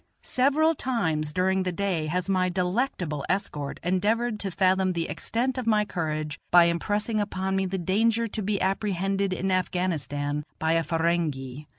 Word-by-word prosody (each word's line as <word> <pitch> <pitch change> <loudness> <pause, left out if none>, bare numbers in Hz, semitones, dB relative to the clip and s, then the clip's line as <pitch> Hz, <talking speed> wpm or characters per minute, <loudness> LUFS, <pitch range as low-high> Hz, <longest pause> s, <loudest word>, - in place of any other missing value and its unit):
Several 285 +5 +3
times 160 - -1
during 190 +3 +1
the 185 -1 -1
day 180 -4 -1
has 180 +4 -1
my 185 -1 +2
delectable 180 - -1
escort 150 -7 -2
endeavored 210 +6 +1
to 200 - -1
fathom 185 0 +2
the 165 -1 -1
extent 240 - -2
of 245 - -5
my 210 -2 +3
courage 155 -5 -3
by 175 0 +7
impressing 205 +6 0
upon 190 -2 -2
me 190 0 +1
the 190 +1 -2
danger 225 +6 +1
to 215 - -4
be 200 0 0
apprehended 195 0 0
in 190 +1 -1
Afghanistan 150 -6 -1
by 160 0 0
a 165 - +3
Ferenghi. 160 -5 -1
185 Hz, 160 wpm, -26 LUFS, 165-205 Hz, -, by